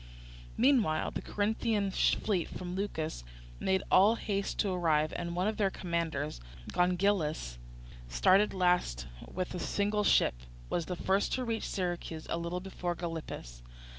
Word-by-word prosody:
Meanwhile 235 - +3
the - - -4
Corinthian 210 -1 0
fleet 190 -2 +1
from 180 -1 -6
Leucas 160 - -3 0.4
made 190 0 +1
all 205 +5 +6
haste 200 -3 -2
to 200 - 0
arrive; 155 -4 +2
and 170 0 -3
one 180 +3 +1
of 215 - -1
their 200 -2 +3
commanders, 165 - -2 0.3
Gongylus, 180 - +1 0.5
starting 185 - +4
last 180 - +1 0.3
with 185 0 -3
a 180 - -3
single 205 +2 0
ship, - - +4 0.4
was 170 -2 -1
the 180 - -2
first 190 +3 +1
to 255 -1 -1
reach 225 -1 -2
Syracuse, 175 -3 -3
a 170 - 0
little 170 +2 -3
before 180 -2 -3
Gylippus. 160 - -6
180 Hz, 140 wpm, -31 LUFS, 165-200 Hz, 0.5 s, all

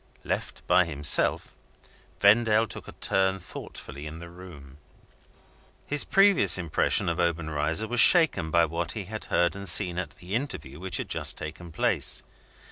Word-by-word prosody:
Left - - -5
by 90 - +3
himself, 75 -3 +1 0.6
Vendale 110 +1 +3
took - - -10
a - - -10
turn 95 0 0
thoughtfully 75 -5 -9
in 75 +1 -9
the 85 0 -11
room. 75 -7 -14 1.1
His 145 -1 0
previous 195 - +3
impression 85 -4 -1
of 85 0 -2
Obenreizer 80 +2 -1
was 120 +1 -2
shaken 160 - +6
by 85 +1 +3
what 85 +1 -4
he 105 - -6
had 110 +3 -8
heard 85 +2 0
and 100 -1 -3
seen 90 0 +3
at 75 -4 -7
the 90 +3 -10
interview 75 - -4
which 95 0 -1
had - - -5
just - - +2
taken 80 +3 -9
place. 80 - -1
85 Hz, 155 wpm, -26 LUFS, 80-100 Hz, 1.1 s, shaken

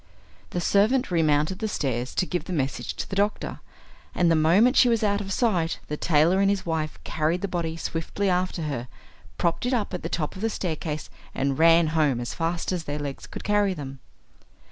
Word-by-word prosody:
The 175 - -2
servant 210 +5 +2
remounted 155 +2 +2
the 220 - -1
stairs 130 - -2
to 185 - +2
give 180 0 -3
the 185 - -5
message 140 -4 -2
to - - -4
the 195 - -5
doctor, 205 +2 -1 0.6
and 175 -2 +3
the - - +4
moment 185 - +4
she 250 - +6
was 230 -2 +1
out 205 -1 +1
of 195 -1 -6
sight 185 -7 +1
the 150 - -1
tailor 165 +4 +3
and 195 0 +4
his 200 -1 0
wife 160 -2 -2
carried 160 +3 -1
the 200 - -1
body 165 -3 -3
swiftly 165 +5 -2
after 180 -2 0
her, 135 -5 -3 0.5
propped 170 +8 0
it 255 - +2
up 210 -4 -2
at 180 - -3
the - - -4
top 155 -3 -2
of 190 - -8
the 225 - +1
staircase, 160 -6 -4 0.2
and 135 +1 0
ran 165 0 +6
home 150 -6 +2
as 120 - -4
fast 170 +2 -2
as 175 -3 -2
their 145 0 -3
legs 145 -2 -6
could - - -8
carry 205 -2 +2
them. 135 -3 -7
170 Hz, 210 wpm, -25 LUFS, 155-200 Hz, 0.6 s, she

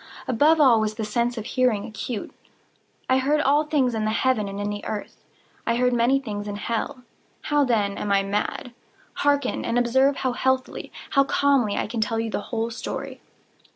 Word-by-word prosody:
Above 300 +6 +4
all 255 -6 +6
was 215 0 -1
the 220 -1 -3
sense 235 +3 -1
of 220 - -4
hearing 245 -6 +1
acute. 215 +1 -5 0.8
I 260 0 +3
heard 290 +3 +2
all 295 +1 +3
things 280 -5 +1
in 220 -1 -1
the 215 - +1
heaven 225 -1 +1
and 195 0 -6
in 205 0 -2
the 205 0 -5
earth. 210 -1 -6 0.4
I 230 - +2
heard 250 +1 +2
many 240 +3 +3
things 210 -5 -5
in 205 - -4
hell. 230 +4 -3 0.4
How, 295 -1 +2
then, 210 -5 0
am 205 - -2
I 195 0 +3
mad? 210 +4 -3 0.4
Hearken! 285 -2 +1
and 230 - -1
observe 265 +3 +3
how 260 - -1
healthily—how 260 +2 -1
calmly 275 -8 +2
I - - 0
can 225 +1 -3
tell 225 +1 0
you 225 -1 -2
the - - -2
whole 230 0 -2
story. 230 - -6
235 Hz, 190 wpm, -24 LUFS, 215-265 Hz, 0.8 s, all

